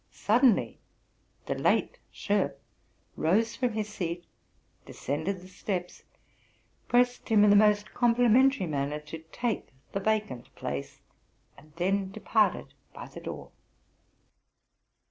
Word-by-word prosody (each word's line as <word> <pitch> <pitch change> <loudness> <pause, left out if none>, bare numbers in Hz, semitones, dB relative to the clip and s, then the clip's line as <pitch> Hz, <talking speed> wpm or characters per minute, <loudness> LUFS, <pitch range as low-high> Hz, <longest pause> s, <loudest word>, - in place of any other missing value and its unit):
Suddenly 220 - +2 0.7
the - - -1
late - - +1
Schoff - - 0 0.6
rose 220 +8 +1
from 250 -3 -1
his 215 -1 -2
seat, 175 -4 -4 0.6
descended 160 +7 -4
the 185 - -13
steps, 185 -1 -5 0.9
pressed 245 0 +2
him 215 -2 +5
in 210 - +6
the - - +6
most 210 0 +3
complimentary 245 +1 +4
manner 145 -1 -2
to 150 +2 -8
take 240 -3 -2 0.2
the 195 - -2
vacant 210 - -2
place, 70 -1 -5 0.5
and 155 - -18
then 190 +2 0
departed 215 +1 0 0.2
by - - -9
the - - -10
door. - - -8
205 Hz, 115 wpm, -28 LUFS, 175-225 Hz, 0.9 s, in